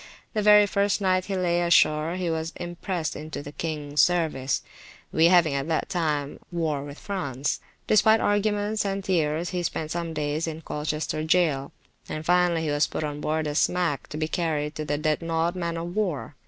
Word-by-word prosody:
The 215 - 0
very 210 0 +7
first 200 +1 +1
night 185 -2 +1
he 195 - -3
lay 175 -1 +1
ashore, 165 -1 +3
he 185 -1 -2
was 160 0 -2
imprest 175 -1 -4
into 150 -2 -6
the 145 - -8
kings 150 -2 -1
service 155 -7 +1 0.5
(we 160 - +4
having 170 -4 +5
at 140 +1 -2
that 160 -1 -1
time 150 -5 -1
war 160 -5 -1
with 145 +1 -9
France); 145 -9 -3 0.3
despite 220 +1 +5
arguments 205 +1 +1
and 195 -1 -2
tears 165 -2 0
he 180 -1 -1
spent 155 -2 -3
some 170 -1 -3
days 150 +2 -1
in 160 0 -5
Colchester 155 0 -3
jail, 155 -5 +2 0.4
and 155 0 -5
finally 175 -1 +3
he 155 - -1
was 145 +1 +2
put - - -4
on 150 -1 -4
board 155 +1 -1
a 150 - -2
smack 170 -1 +1
to 150 - -7
be 155 0 -1
carried 155 -3 -1
to 155 -1 -5
the 145 0 -1
Dreadnought 165 +2 0
man 170 -2 -2
of 170 +2 -5
war. 185 -10 -1
165 Hz, 185 wpm, -26 LUFS, 150-180 Hz, 0.5 s, very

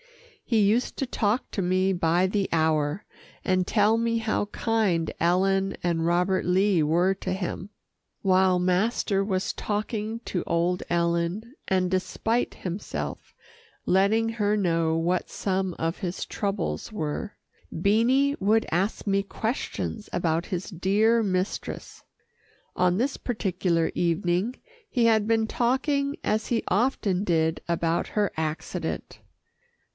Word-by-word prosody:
He 230 -3 +1
used 215 +5 +2
to 270 - -1
talk 230 -1 0
to 200 - -2
me 185 +1 +2
by 175 +1 +2
the 195 0 -1
hour, 160 +2 +1 0.4
and 185 -1 +2
tell 215 +2 +3
me 230 0 +1
how 220 -2 0
kind 205 -7 0
Ellen 195 +3 +2
and 165 -2 0
Robert 180 +2 +2
Lee 185 -1 +3
were 175 +5 +3
to 190 -1 -5
him. 185 +1 -4 0.5
While 185 -1 +3
master 195 +2 +1
was 190 -2 -1
talking 215 +1 -3
to 180 - -2
old 175 +2 0
Ellen, 170 +6 0 0.2
and 185 -1 +2
despite 220 +5 -1
himself, 185 +2 -5 0.5
letting 200 +5 +3
her 215 -2 0
know 165 -4 +1
what 175 +2 0
some 190 -2 -1
of 165 +2 -2
his 180 -3 -3
troubles 200 0 -3
were, 160 +1 -4 0.3
Beanie 235 - +3
would 215 +3 +3
ask 190 +6 -1
me 200 0 +2
questions 220 0 -4
about 165 0 0
his 180 0 -4
dear 210 +5 +2
mistress. 185 -1 -3 0.7
On 180 0 +2
this 265 +5 0
particular 185 -7 0
evening 175 +6 0 0.3
he 240 -3 +2
had 220 -2 +3
been 225 -1 +2
talking 280 +5 0
as 215 +1 0
he 235 -2 0
often 200 -3 +1
did 160 -3 +1
about 170 0 0
her 210 -2 0
accident. 155 0 -4
190 Hz, 130 wpm, -26 LUFS, 175-220 Hz, 0.7 s, tell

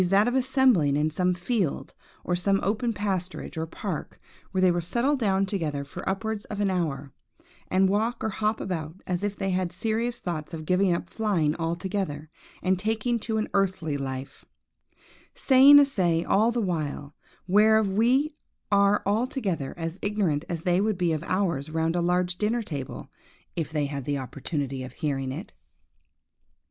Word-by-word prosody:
that 200 +3 +4
of 245 - +1
assembling 255 - +3
in 155 +1 +1
some 180 +3 +1
field, 180 - -2 0.3
or 175 - -1 0.3
open 220 +4 0
pasturage, 190 -5 -3
or 160 0 -3
park, 170 0 -5 0.3
where 190 - -2
they 185 -1 +5
will 175 0 0
settle 240 - +1
down 195 -6 +1
together 160 -8 -2
for 140 - -8
upwards 215 +2 -2
of 205 - -6
an 200 -2 +1
hour, 145 -7 -2 0.5
and 190 +1 +3
walk 220 +5 0
or 220 - 0
hop 215 +1 -1
about, 160 -4 -4
as 180 -1 -2
if 205 0 -2
they 195 -1 -2
had 185 -1 0
serious 225 +5 -1
thoughts 165 -1 -4
of 155 -1 -7
giving 185 +2 +3
up 170 0 -1
flying 175 -8 0
altogether, 170 -2 -3 0.3
and 185 0 +2
taking 225 +3 0
to 220 0 -2
an 215 - 0
earthly 185 -6 0
life; 135 -1 -5 0.9
saying 275 +2 +7
a 285 - +8
say, 175 -11 +1
all 220 +6 +3
the 240 - -1
while, 155 -7 -3 0.3
whereof 215 +2 +5
we 245 +10 +2 0.4
are 200 0 +4
altogether 205 - -1
as 165 +2 -4
ignorant 195 -8 0
as 170 -2 -3
they 180 +1 +2
would 215 -2 0
be 175 -3 +1
of 155 - -2
ours 170 -7 0
round 160 +1 0
a 175 - +1
large 180 0 +1
dinner 225 +3 0
table, 140 -9 -6 0.4
if 160 -2 -3
they 150 -2 0
had 140 -2 -5
the 145 -1 -1
opportunity 135 +1 -4
of 130 - -7
hearing 135 -3 -2
it. 160 - -7
185 Hz, 170 wpm, -26 LUFS, 160-215 Hz, 0.9 s, a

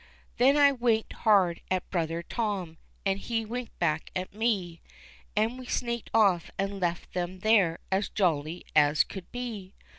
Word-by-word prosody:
Then 270 +4 +5
I 285 -1 +7
winked 235 -4 0
hard 190 -6 +3
at 185 -1 -1
brother 170 -1 -1
Tom, 190 -7 -3 0.3
and 195 0 +1
he 225 +1 -2
winked 240 +2 -6
back 155 -3 0
at 185 +1 -3
me, 200 -6 -1 0.5
And 225 +4 +1
we 255 - -9
sneaked 235 -2 -2
off 195 -6 +3
and 195 0 -2
left 175 -1 -2
them 180 +1 -3
there 200 -6 +4
as 195 +2 +1
jolly 165 -3 0
as 150 0 +5
could 190 -3 -10
be. 225 -6 -6
195 Hz, 155 wpm, -28 LUFS, 175-225 Hz, 0.5 s, I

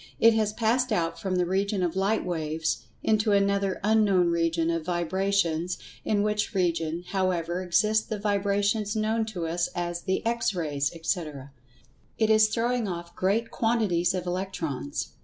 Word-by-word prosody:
It 230 0 +6
has 215 -1 +1
passed[Pg 240 +3 +1
132] 215 - +1
out 165 -2 -1
from 190 -2 -2
the 180 -1 +2
region 195 +1 0
of 175 -1 -1
light 195 +3 +1
waves, 160 -2 -1 0.2
into 215 -1 +2
another 200 -1 +1
"Unknown 205 -5 +3
Region" 165 0 +1
of 165 -1 -2
Vibrations, 175 0 0 0.3
in 205 -1 +1
which 210 0 -1
region, 170 -2 0
however, 180 -2 0
exist 215 +4 +2
the 215 - -2
vibrations 205 +1 0
known 220 +1 0
to 180 -6 -4
us 170 +2 -1
as 175 -1 -2
the 190 +3 -2
"X 230 -3 0
Rays," 145 -5 -1
etc. 155 -5 -3 0.7
It 220 -1 +2
is 215 0 +5
throwing 240 0 0
off 170 -1 -6
great 215 +5 0
quantities 200 -6 +1
of 180 -1 -3
Electrons. 175 - -3
190 Hz, 160 wpm, -27 LUFS, 170-215 Hz, 0.7 s, It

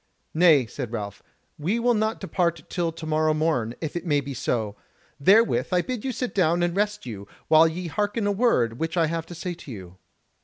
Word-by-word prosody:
"Nay," 155 -6 +5
said 120 +1 -6
Ralph, 105 -4 -5 0.4
"we 180 +10 0
will 240 +1 +3
not 220 0 0
depart 170 -5 -1
till 170 -3 0
tomorrow 155 -1 0
morn, 150 -8 0
if 155 -1 -4
it 175 - -3
may 150 -5 +2
be 140 0 -5
so. 110 -4 -2 0.4
Therewith 210 +10 +4
I 180 -1 +2
bid 250 -4 -4
you 265 - -1
sit 250 +1 -3
down 175 -2 +2
and 175 0 0
rest 210 -2 -1
you, 100 -5 -7 0.2
while 160 +1 +7
ye 175 +3 -4
hearken 205 +6 -1
a 205 - +2
word 160 - +1
which 165 +2 -2
I 165 - +4
have 165 0 -3
to 175 - -9
say 175 +2 -4
to 160 -5 -11
you." 95 -4 -10
165 Hz, 205 wpm, -25 LUFS, 140-195 Hz, 0.4 s, while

